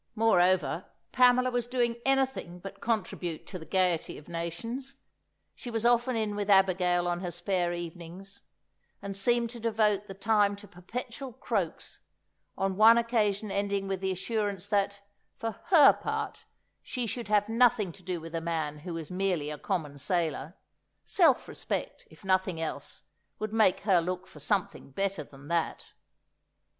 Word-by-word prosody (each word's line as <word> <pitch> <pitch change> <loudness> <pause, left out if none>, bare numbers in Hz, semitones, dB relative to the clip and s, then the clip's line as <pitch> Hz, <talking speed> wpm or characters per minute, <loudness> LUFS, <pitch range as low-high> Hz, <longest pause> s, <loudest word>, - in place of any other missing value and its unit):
Moreover, 185 -6 +3 0.3
Pamela 255 0 +5
was 245 -1 -1
doing 240 -2 +1
anything 265 -10 +1
but 195 +2 -10
contribute 180 -7 -2
to 185 - -7
the 160 - -11
gaiety 180 -3 +1
of 150 - -13
nations! 230 +12 -5 0.6
She 245 - -8
was 225 -1 -2
often 240 +1 +3
in 215 -2 -1
with 205 0 -3
Abigail 180 -2 +4
on 175 0 0
her 180 -1 -3
spare 175 0 -1
evenings; 175 +3 -7 0.6
and 200 -1 -6
seemed 235 +3 +1
to 240 - -9
devote 215 -3 +1
the 195 - -8
time 205 0 +2
to 200 +1 -13
perpetual 235 +7 -7
croaks, 200 -8 -3 0.6
on 190 -1 -1
one 225 +2 +8
occasion 215 -3 +1
ending 200 0 -1
with 195 -1 -2
the 190 0 0
assurance 200 0 -2
that, 200 -1 +1 0.4
for 225 - -2
her 315 -7 +8
part, - - -4 0.4
she 250 -2 -3
should 230 0 -4
have 210 -1 +3
nothing 230 -4 +3
to 185 - -14
do 180 -1 -3
with 165 +1 -9
a 165 - -2
man 160 -3 -2
who 170 +2 -6
was 165 -1 -6
merely 180 -5 0
a 150 - -5
common 155 -8 -3
sailor; 170 -1 -1 0.5
self 320 -9 +3
respect, - - -4
if 205 - -17
nothing 185 -2 +1
else, 155 -3 -4 0.3
would 215 0 -4
make 220 -4 +4
her 190 -4 +4
look 180 +2 -3
for 150 - -14
something 185 0 -1
better 195 +3 -2
than 140 0 -15
that. 170 0 -2
195 Hz, 160 wpm, -29 LUFS, 175-225 Hz, 0.6 s, one